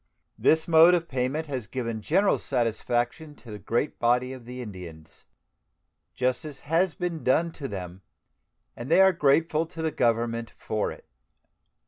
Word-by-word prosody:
This 160 Hz, 0 st, +3 dB
mode 165 Hz, +2 st, +7 dB
of 170 Hz, -1 st, -2 dB
payment 130 Hz, +5 st, -2 dB
has 130 Hz, -7 st, -5 dB
given 115 Hz, -3 st, -4 dB
general 195 Hz, -, +2 dB
satisfaction 120 Hz, +4 st, -1 dB
to 120 Hz, -4 st, -13 dB
the 105 Hz, -, -7 dB
great 120 Hz, +8 st, -2 dB
body 125 Hz, +2 st, +2 dB
of 130 Hz, -3 st, -11 dB
the 125 Hz, +1 st, -8 dB
Indians. 90 Hz, -9 st, -9 dB, 0.9 s
Justice 130 Hz, +4 st, -2 dB
has 165 Hz, +4 st, +1 dB
been 175 Hz, -3 st, -4 dB
done 165 Hz, +6 st, +2 dB
to 145 Hz, -4 st, -6 dB
them, 95 Hz, -3 st, -7 dB, 0.7 s
and 120 Hz, +3 st, -7 dB
they 165 Hz, -, +5 dB
are 190 Hz, 0 st, +6 dB
grateful 155 Hz, +1 st, +2 dB
to 165 Hz, -1 st, -7 dB
the 160 Hz, -, 0 dB
Government 115 Hz, -3 st, 0 dB
for 110 Hz, -1 st, -2 dB
it. -, -, -12 dB
130 Hz, 150 wpm, -26 LUFS, 115-160 Hz, 0.9 s, mode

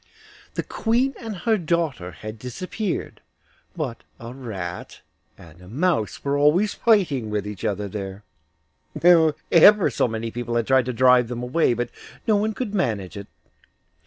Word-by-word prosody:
The -, -, -1 dB
Queen 245 Hz, +4 st, 0 dB
and 225 Hz, -3 st, -6 dB
her 220 Hz, +3 st, +1 dB
daughter 160 Hz, -, -1 dB
had 110 Hz, +3 st, -9 dB
disappeared, 185 Hz, -, -4 dB, 0.5 s
but 140 Hz, -9 st, -4 dB, 0.2 s
a 115 Hz, +1 st, -8 dB
rat 95 Hz, -9 st, -7 dB, 0.4 s
and 85 Hz, -2 st, -16 dB
a 90 Hz, -, -14 dB
mouse 145 Hz, -, -1 dB
were 140 Hz, 0 st, +1 dB
always 155 Hz, +9 st, +3 dB
fighting 175 Hz, -, +2 dB
with 105 Hz, -1 st, -2 dB
each 105 Hz, -1 st, -7 dB
other 105 Hz, -2 st, -1 dB
there. 100 Hz, 0 st, -6 dB, 1.3 s
Ever 205 Hz, +4 st, +7 dB
so -, -, +1 dB
many 115 Hz, 0 st, -4 dB
people 120 Hz, 0 st, -4 dB
had 115 Hz, -1 st, +1 dB
tried 130 Hz, 0 st, +3 dB
to 125 Hz, -, -3 dB
drive 125 Hz, 0 st, +5 dB
them 120 Hz, 0 st, -5 dB
away, 125 Hz, 0 st, +2 dB
but 120 Hz, +1 st, -3 dB, 0.4 s
no 215 Hz, -, +4 dB
one 215 Hz, +1 st, 0 dB
could 235 Hz, -5 st, -4 dB
manage 110 Hz, -, -1 dB
it. 100 Hz, 0 st, -8 dB
125 Hz, 155 wpm, -23 LUFS, 110-180 Hz, 1.3 s, Ever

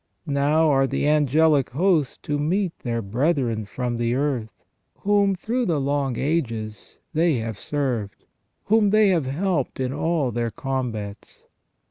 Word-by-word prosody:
Now 145 Hz, +2 st, +2 dB
are 135 Hz, -2 st, +3 dB
the 145 Hz, -, -1 dB
angelic 150 Hz, -1 st, +3 dB
hosts 160 Hz, 0 st, +1 dB
to 145 Hz, 0 st, -2 dB
meet 175 Hz, +4 st, -1 dB
their 115 Hz, -2 st, -3 dB
brethren 120 Hz, 0 st, 0 dB
from 120 Hz, +3 st, -3 dB
the 120 Hz, +1 st, 0 dB
earth, 125 Hz, -7 st, -2 dB, 0.4 s
whom, 200 Hz, -1 st, +3 dB
through 235 Hz, +6 st, -2 dB
the 160 Hz, -4 st, +1 dB
long 140 Hz, -2 st, -1 dB
ages, 115 Hz, -8 st, -3 dB, 0.2 s
they 165 Hz, -1 st, +3 dB
have 110 Hz, -3 st, -4 dB
served; 125 Hz, -9 st, -3 dB, 0.4 s
whom 215 Hz, 0 st, +3 dB
they 215 Hz, 0 st, +5 dB
have 165 Hz, -8 st, +1 dB
helped 155 Hz, -1 st, -1 dB
in 130 Hz, 0 st, -1 dB
all 160 Hz, -6 st, 0 dB
their 120 Hz, 0 st, -1 dB
combats. 115 Hz, -4 st, -5 dB
140 Hz, 140 wpm, -23 LUFS, 120-165 Hz, 0.4 s, they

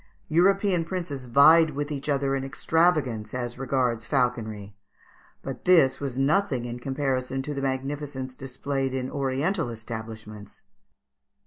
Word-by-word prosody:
European 185 Hz, +2 st, +3 dB
princes 165 Hz, -7 st, -4 dB
vied 155 Hz, +5 st, +6 dB
with 145 Hz, +1 st, -3 dB
each 145 Hz, 0 st, -4 dB
other 140 Hz, -1 st, +1 dB
in 135 Hz, -, -2 dB
extravagance 135 Hz, -6 st, +1 dB
as 120 Hz, 0 st, -4 dB
regards 125 Hz, -4 st, 0 dB
falconry; 110 Hz, -6 st, -1 dB, 0.7 s
but 135 Hz, -2 st, -7 dB
this 160 Hz, -8 st, +5 dB
was 135 Hz, -3 st, -4 dB
nothing 135 Hz, -2 st, +1 dB
in 120 Hz, 0 st, -5 dB
comparison 135 Hz, 0 st, -2 dB
to 150 Hz, -, -4 dB
the 140 Hz, -, -3 dB
magnificence 135 Hz, 0 st, -3 dB
displayed 135 Hz, 0 st, -3 dB
in 130 Hz, 0 st, -3 dB
oriental 140 Hz, +5 st, -1 dB
establishments. 110 Hz, -2 st, -8 dB
135 Hz, 125 wpm, -26 LUFS, 125-145 Hz, 0.7 s, vied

